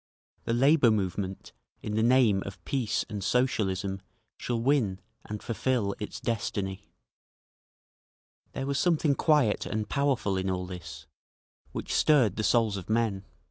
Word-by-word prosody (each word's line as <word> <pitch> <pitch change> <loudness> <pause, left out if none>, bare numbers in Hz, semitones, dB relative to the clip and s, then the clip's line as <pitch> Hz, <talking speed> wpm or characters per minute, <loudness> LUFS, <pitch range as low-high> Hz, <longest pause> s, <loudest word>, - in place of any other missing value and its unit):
The 115 - 0
labour 135 +1 +5
movement, 95 -2 -2 0.3
in 105 - -4
the 110 - +1
name 115 -4 +4
of 95 -2 -10
peace 125 -6 -1
and 105 -2 -5
Socialism, 95 -4 0 0.3
shall 120 -2 -2
win, 115 -7 +1 0.3
and 105 0 -6
fulfil 115 -3 0
its 105 - -6
destiny…." 100 -4 -3 1.6
There 135 - -3
was 140 0 -1
something 160 -4 +2
quiet 145 -7 +2
and 110 0 -2
powerful 135 -9 0
in 95 0 -1
all 90 -1 -2
this, 80 -5 -9 0.7
which - - -4
stirred 130 - +4
the 110 - -2
souls 110 -3 +2
of 95 - -8
men. 110 -4 0
110 Hz, 140 wpm, -28 LUFS, 95-130 Hz, 1.6 s, labour